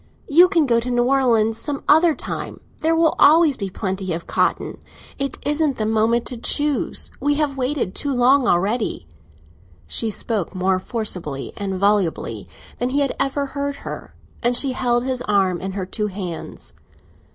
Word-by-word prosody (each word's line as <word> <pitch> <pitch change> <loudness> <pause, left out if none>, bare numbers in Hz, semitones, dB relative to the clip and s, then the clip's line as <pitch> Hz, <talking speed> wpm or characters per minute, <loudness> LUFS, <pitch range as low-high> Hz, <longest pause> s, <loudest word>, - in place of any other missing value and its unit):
You 345 +4 +7
can 340 -5 +2
go 235 -3 +3
to 240 +2 -4
New 245 -1 +2
Orleans 235 -4 +2
some 285 -2 -4
other 320 +1 +5
time—there 325 +1 -4
will 325 -1 +3
always 310 -1 +6
be 200 -4 -4
plenty 190 -1 -3
of 165 +1 -5
cotton. - - -1 0.4
It 275 -1 -2
isn't 295 -2 +1
the 215 - -1
moment 225 +2 +1
to 250 - -5
choose—we 290 +2 0
have 295 -2 0
waited 260 -6 -1
too 285 - -3
long 255 +1 +4
already." 200 - 0 0.8
She 220 - -1
spoke 210 -3 -3
more 185 0 +1
forcibly 180 - -4
and 195 -1 -3
volubly 200 -4 0 0.3
than 245 - 0
he 280 +3 +1
had 275 - 0
ever 280 +1 0
heard 280 0 -5
her, - - -7 0.3
and 240 +1 +2
she 270 0 +2
held 240 -1 0
his 255 -1 -2
arm 190 -4 +2
in 190 0 -4
her 190 -1 -3
two 210 +3 -2
hands. 185 -4 -7
240 Hz, 165 wpm, -21 LUFS, 200-280 Hz, 0.8 s, You